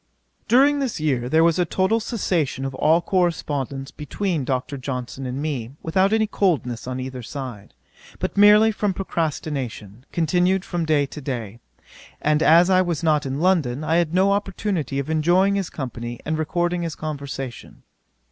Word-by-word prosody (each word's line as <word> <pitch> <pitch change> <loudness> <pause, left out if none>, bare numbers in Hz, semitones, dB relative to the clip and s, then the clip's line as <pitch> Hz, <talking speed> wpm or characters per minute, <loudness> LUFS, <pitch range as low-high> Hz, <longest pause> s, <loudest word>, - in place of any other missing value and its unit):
During 280 +4 +5
this 260 -10 -2
year 130 -5 0
there 160 +3 +4
was 170 +1 +3
a - - +4
total 190 +6 +1
cessation 175 - -1
of 135 - -4
all 160 +5 +3
correspondence 145 -7 -1
between 160 0 -3
Dr. 130 +2 -2
Johnson 130 0 -5
and 125 +2 -4
me, 135 -5 -3
without 190 +5 +2
any 220 0 +3
coldness 155 - -1
on 130 0 -3
either 130 0 -5
side, 120 - -8 0.4
but - - -3
merely 210 +2 +7
from 205 -2 -1
procrastination, 140 - -4
continued 180 +3 +1
from 175 -2 -2
day 150 -2 +3
to 150 +2 -9
day; 120 -5 -5 0.6
and 150 0 +1
as 170 +2 +6
I 185 -1 +4
was 170 -3 -2
not 150 -3 +2
in 135 +3 -3
London, 155 -7 +1
I 160 +2 +2
had 170 -3 +1
no 190 +3 +3
opportunity 195 - -2
of 140 - -2
enjoying 175 +5 +3
his 195 -3 -1
company 120 -4 -6
and 155 - -1
recording 175 +3 -1
his 165 -3 -3
conversation. 140 -5 -6
155 Hz, 165 wpm, -22 LUFS, 135-185 Hz, 0.6 s, merely